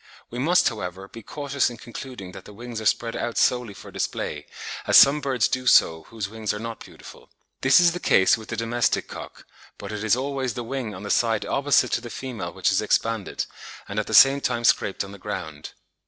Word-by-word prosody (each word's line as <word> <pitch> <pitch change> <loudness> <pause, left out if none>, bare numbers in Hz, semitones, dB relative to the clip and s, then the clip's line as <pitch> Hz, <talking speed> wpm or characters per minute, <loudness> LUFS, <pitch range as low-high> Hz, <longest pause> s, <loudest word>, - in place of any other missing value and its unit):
We 120 - -5
must, 170 +7 +3
however, 95 -4 -5
be 115 - -11
cautious 140 +4 -1
in 120 - -9
concluding 120 -5 -9
that - - -11
the 105 - -12
wings 120 0 -7
are 110 - 0
spread 115 0 0
out 120 - -3
solely 125 -5 +1
for - - -12
display, - - -4 0.4
as - - +7
some 145 +2 +7
birds 130 -6 +1
do 130 0 -3
so 80 -8 +4
whose 110 -4 -5
wings 110 0 -3
are - - -5
not 115 0 -7
beautiful. - - -14 0.3
This 130 0 +6
is 175 -1 +5
the 175 - -5
case 95 - +4
with 110 -1 -11
the 115 - -4
domestic 115 +2 0
cock, - - -10 0.3
but 100 - -8
it 105 0 -5
is 110 +1 +3
always 135 -1 -3
the 120 - -4
wing 120 -3 -4
on 90 - -9
the 100 - -3
side 115 -2 +1
opposite 135 -2 +2
to - - 0
the 120 - -8
female 125 -3 -6
which - - 0
is - - +2
expanded, 115 -3 -1 0.4
and 100 +2 -3
at 105 - -3
the - - 0
same 135 +1 +7
time 120 -2 -1
scraped 100 -4 +2
on 100 - -10
the 100 - -11
ground. 85 -8 -6
115 Hz, 220 wpm, -24 LUFS, 105-130 Hz, 0.4 s, as